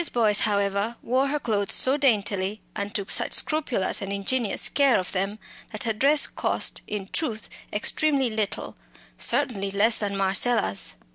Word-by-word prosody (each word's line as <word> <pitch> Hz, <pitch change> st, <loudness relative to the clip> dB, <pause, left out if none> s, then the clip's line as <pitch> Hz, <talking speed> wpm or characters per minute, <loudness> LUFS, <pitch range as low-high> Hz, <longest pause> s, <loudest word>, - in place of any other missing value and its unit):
Boyce, 215 Hz, -4 st, +4 dB
however, 200 Hz, +1 st, 0 dB
wore 260 Hz, +3 st, +1 dB
her 295 Hz, +2 st, -1 dB
clothes 210 Hz, -6 st, 0 dB
so 260 Hz, +2 st, +3 dB
daintily, 210 Hz, -7 st, 0 dB, 0.2 s
and 205 Hz, +1 st, -5 dB
took 200 Hz, -2 st, -2 dB
such -, -, 0 dB
scrupulous 290 Hz, -, +1 dB
and 195 Hz, 0 st, -5 dB
ingenious 200 Hz, +3 st, 0 dB
care 280 Hz, -4 st, +3 dB
of 185 Hz, -2 st, -3 dB
them, 195 Hz, +2 st, -2 dB, 0.3 s
that 215 Hz, -, -5 dB
her 225 Hz, -, -1 dB
dress 285 Hz, +7 st, +3 dB
cost, -, -, -1 dB
in 205 Hz, -2 st, -5 dB
truth, 225 Hz, -9 st, -2 dB, 0.2 s
extremely 270 Hz, +3 st, +1 dB
little 215 Hz, -2 st, -3 dB, 0.4 s
certainly 200 Hz, -6 st, +1 dB
less 210 Hz, +3 st, +3 dB
than 200 Hz, -2 st, -3 dB
Marcella's. 195 Hz, -, +1 dB
215 Hz, 150 wpm, -25 LUFS, 200-255 Hz, 0.4 s, Boyce